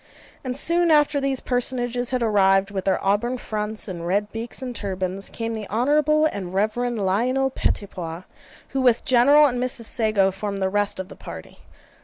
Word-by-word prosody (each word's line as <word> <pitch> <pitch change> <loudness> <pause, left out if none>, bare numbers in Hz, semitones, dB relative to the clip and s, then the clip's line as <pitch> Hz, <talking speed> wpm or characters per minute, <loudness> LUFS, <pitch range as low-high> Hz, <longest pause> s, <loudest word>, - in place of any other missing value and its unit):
And 255 -1 -3
soon 340 +3 +2
after 295 -2 +3
these 275 -1 -1
personages 245 -1 -1
had 255 -2 -1
arrived, 195 -2 +3
with 190 -2 -4
their 190 -1 +2
auburn 225 +6 +1
fronts 215 -2 -4
and 170 -3 -5
red 205 +3 0
beaks 225 +1 -5
and 255 -2 -5
turbans, 190 -1 -4
came 230 0 -4
the 215 -2 -6
Honourable 300 +7 +2
and 190 - -3
Reverend 220 +1 0
Lionel 255 +8 +1
Pettipois, 180 -7 -3 0.5
who 270 - -1
with 245 -3 +3
General 280 +4 +6
and 250 -3 0
Mrs. 250 -2 -2
Sago 215 -4 +2
formed 200 +1 -4
the 190 0 0
rest 205 0 0
of 190 - -4
the - - -12
party. 80 -1 -10
225 Hz, 175 wpm, -23 LUFS, 195-255 Hz, 0.5 s, General